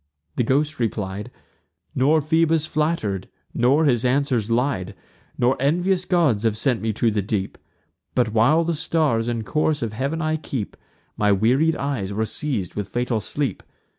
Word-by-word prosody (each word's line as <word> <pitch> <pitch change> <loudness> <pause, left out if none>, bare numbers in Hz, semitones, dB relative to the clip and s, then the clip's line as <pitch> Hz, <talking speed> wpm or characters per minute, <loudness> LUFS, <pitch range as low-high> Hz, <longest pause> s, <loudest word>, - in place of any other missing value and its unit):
The 125 - +1
ghost 145 +5 0
replied; 105 -2 -3 0.6
"Nor 150 +5 +3
Phoebus 160 0 +2
flatter'd, 150 - -1 0.2
nor 135 +6 +3
his 120 -4 +2
answers 125 -4 +1
lied; 120 -5 0 0.4
Nor 125 +2 +3
envious 180 +6 +1
gods 160 - +2
have 110 -2 0
sent 125 0 0
me 110 0 0
to 115 +2 +1
the 105 -1 0
deep: 100 -1 -2 0.6
But, 120 -4 +1
while 145 +9 +4
the 170 +1 -1
stars 155 -7 0
and 115 -2 -2
course 155 0 0
of 110 -2 -3
heav'n 140 +8 -2
I 155 -1 0
keep, 130 -8 -5 0.4
My 105 -1 +3
wearied 130 +11 +3
eyes 125 -9 -3
were 110 +2 0
seiz'd 110 - -3
with 105 -2 -4
fatal 120 +2 -1
sleep. 140 +6 -2
125 Hz, 160 wpm, -23 LUFS, 110-155 Hz, 0.6 s, while